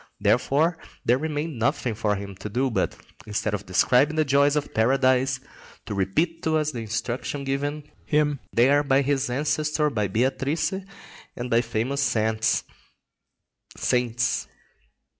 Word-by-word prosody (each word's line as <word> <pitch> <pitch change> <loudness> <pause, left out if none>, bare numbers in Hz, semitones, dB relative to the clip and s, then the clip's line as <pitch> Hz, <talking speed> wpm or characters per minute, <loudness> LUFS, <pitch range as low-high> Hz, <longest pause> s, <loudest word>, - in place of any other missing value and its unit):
Therefore 160 +4 +2 0.3
there 125 +2 +3
remained 150 -2 -3
nothing 125 -1 0
for 105 -1 0
him 100 0 -6
to 105 - -6
do 130 +5 0
but, - - 0 0.3
instead 105 0 -1
of 105 0 -4
describing 125 - +3
the 155 -1 +2
joys 140 +1 +3
of 150 - -2
paradise, 130 +2 +2 0.5
to 105 - -5
repeat 155 - 0
to 160 0 +1
us 155 -1 0
the 125 - -5
instruction 120 +5 -3
given 145 +2 -2 0.2
him 150 -2 +2
there 135 +5 +4
by 140 -1 +2
his 140 -1 0
ancestor, 150 +3 0
by 105 -5 0
Beatrice, 135 - 0 0.6
and 125 0 -5
by 115 +1 +4
various 120 +4 -2 1.8
saints. 125 0 0
135 Hz, 135 wpm, -25 LUFS, 115-145 Hz, 1.8 s, there